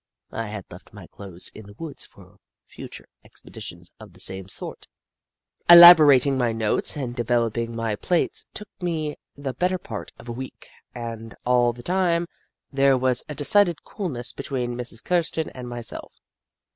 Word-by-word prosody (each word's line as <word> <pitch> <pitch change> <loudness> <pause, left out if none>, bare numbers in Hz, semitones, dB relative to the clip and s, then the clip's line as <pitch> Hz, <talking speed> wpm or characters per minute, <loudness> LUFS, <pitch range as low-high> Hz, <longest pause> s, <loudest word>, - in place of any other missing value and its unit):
I 115 -1 -4
had 105 -2 -7
left 90 +4 -14
my 100 -4 -11
clothes 95 -1 -8
in 110 -2 -12
the 100 - -14
woods 160 -3 -7
for - - -19 0.3
future - - -11 0.2
expeditions 85 0 -12
of 105 -4 -13
the 90 - -17
same 95 0 -1
sort. - - -7 0.8
Elaborating 150 -6 +9
my 120 -2 +1
notes 110 +5 -1
and 125 -4 -4
developing 115 -1 -1
my 115 -2 -2
plates 175 - -1
took 210 - -7
me 160 -4 -2 0.2
the 140 -2 -5
better 180 +8 0
part 110 - -8
of - - -14
a - - -4
week, 130 +2 -9 0.3
and 115 -2 -7
all 120 -1 +3
the 120 +1 -12
time, 175 -2 +1 0.5
there 135 -1 +4
was 130 -1 +2
a 150 - -5
decided 170 +2 +2
coolness 125 - -5
between 125 -3 -3
Mrs. 120 -1 -6
Kirsten 165 -2 0
and 125 -1 -8
myself. 120 -1 -7
125 Hz, 160 wpm, -24 LUFS, 115-155 Hz, 0.8 s, Elaborating